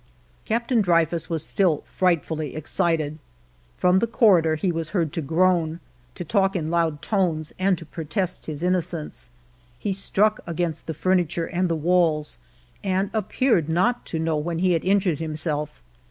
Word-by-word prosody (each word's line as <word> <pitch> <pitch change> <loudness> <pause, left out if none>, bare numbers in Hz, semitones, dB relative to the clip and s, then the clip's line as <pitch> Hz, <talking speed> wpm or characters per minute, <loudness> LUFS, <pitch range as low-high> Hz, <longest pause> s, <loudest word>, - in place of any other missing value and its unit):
Captain 235 +1 +1
Dreyfus 170 -3 +1
was 165 -3 -2
still 175 -7 +1
frightfully 160 -5 -1
excited. 155 0 -1 0.6
From 180 +1 +4
the 230 - +1
corridor 190 -9 +4
he 175 +4 0
was 165 -2 -3
heard 165 -4 0
to 165 - -2
groan, 165 +1 +1 0.4
to 175 - -6
talk 195 +2 +1
in 160 -3 -2
loud 165 -4 0
tones, 170 -7 0
and 185 -1 +2
to 165 - -10
protest 165 +4 -3
his 155 0 -5
innocence. 175 -6 -2 0.5
He 195 +10 -2
struck 210 +2 +1
against 170 -2 -3
the 160 - -3
furniture 175 -1 +1
and 180 +1 -1
the 165 - +1
walls, 160 - +1 0.4
and 195 +1 0
appeared 215 - +1
not 185 +9 +1
to 165 - -3
know 160 -1 0
when 165 +2 -2
he 185 +2 +2
had 165 - 0
injured 185 -4 +2
himself. 155 - -3
170 Hz, 155 wpm, -24 LUFS, 155-185 Hz, 0.6 s, From